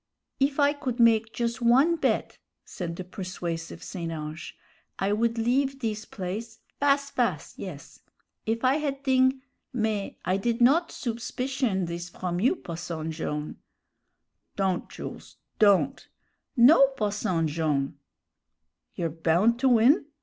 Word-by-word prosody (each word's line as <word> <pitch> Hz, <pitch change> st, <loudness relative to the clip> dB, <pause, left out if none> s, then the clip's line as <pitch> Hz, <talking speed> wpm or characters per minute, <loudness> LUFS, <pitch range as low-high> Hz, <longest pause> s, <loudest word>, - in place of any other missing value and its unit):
"If 275 Hz, +1 st, +1 dB
I 285 Hz, 0 st, +4 dB
could 260 Hz, -4 st, -4 dB
make 225 Hz, -1 st, +4 dB
jus' 235 Hz, +1 st, -2 dB
one 265 Hz, +8 st, +5 dB
bet," 320 Hz, -, -1 dB, 0.3 s
said 170 Hz, -2 st, -5 dB
the 185 Hz, -, -5 dB
persuasive 180 Hz, -3 st, -5 dB
St. 170 Hz, -3 st, -5 dB
Ange, 155 Hz, 0 st, -6 dB, 0.4 s
"I 195 Hz, +1 st, 0 dB
would 230 Hz, +2 st, +1 dB
leave 265 Hz, +4 st, +1 dB
this 220 Hz, -3 st, -3 dB
place, 215 Hz, +4 st, -6 dB, 0.2 s
fas' 280 Hz, 0 st, +2 dB
fas', 210 Hz, -, -1 dB
yes. 170 Hz, -7 st, -9 dB, 0.5 s
If 230 Hz, +3 st, 0 dB
I 265 Hz, +3 st, +4 dB
had 280 Hz, -2 st, -3 dB
thing 260 Hz, 0 st, +3 dB, 0.3 s
mais 220 Hz, -4 st, -1 dB
I 185 Hz, +2 st, +2 dB
did 230 Hz, +4 st, -1 dB
not 295 Hz, +8 st, +4 dB
soupspicion 240 Hz, -3 st, -2 dB
this 170 Hz, +1 st, -5 dB
from 175 Hz, 0 st, -3 dB
you, 250 Hz, -, +3 dB
Posson 165 Hz, -, -5 dB
Jone' 150 Hz, -2 st, -4 dB, 0.5 s
" -, -, -52 dB
"Don't, 190 Hz, -2 st, -1 dB
Jools, -, -, -9 dB, 0.2 s
don't!" 210 Hz, +6 st, +3 dB, 0.5 s
"No, 275 Hz, +3 st, +8 dB
Posson 200 Hz, -6 st, 0 dB
Jone'!" 145 Hz, -3 st, -1 dB, 1.0 s
"You're 170 Hz, -, -1 dB
bound 170 Hz, +9 st, +2 dB
to 265 Hz, +1 st, +3 dB
win?" 250 Hz, -, +5 dB
220 Hz, 135 wpm, -27 LUFS, 175-260 Hz, 1.0 s, No